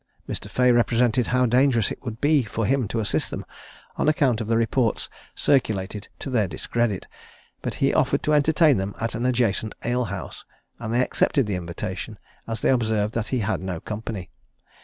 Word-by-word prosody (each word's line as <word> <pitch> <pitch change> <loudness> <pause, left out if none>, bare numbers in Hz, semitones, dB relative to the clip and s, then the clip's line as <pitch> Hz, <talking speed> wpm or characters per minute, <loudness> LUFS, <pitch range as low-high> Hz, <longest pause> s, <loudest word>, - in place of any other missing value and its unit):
Mr. - - -5
Fea 125 0 +3
represented 120 +1 +3
how 125 +1 +3
dangerous 125 -2 +3
it - - -6
would 115 -3 -6
be 145 0 +4
for 110 -1 -3
him 130 -1 +1
to 115 - -2
assist 105 - 0
them, - - -5 0.5
on - - +2
account 130 -7 +2
of 110 - -4
the 115 0 +2
reports 115 0 +1 0.3
circulated 105 -6 0
to 135 - -6
their 110 -6 +2
discredit; 110 +2 -1 0.6
but - - -3
he - - +2
offered - - +2
to 150 - +2
entertain 150 -1 +4
them 95 +1 -3
at 115 0 -2
an 120 +2 -1
adjacent 115 -4 0
ale 125 +1 +1
house; 100 -2 -6 0.4
and 115 -2 -4
they 120 +2 +3
accepted 135 0 +2
the 105 - -2
invitation, 85 -2 -5 0.3
as 115 -1 -4
they - - +4
observed 110 -4 +1
that 115 -2 -2
he 130 -3 0
had 105 -1 -1
no 95 -3 -4
company. 105 -2 -6
115 Hz, 185 wpm, -24 LUFS, 105-125 Hz, 0.6 s, be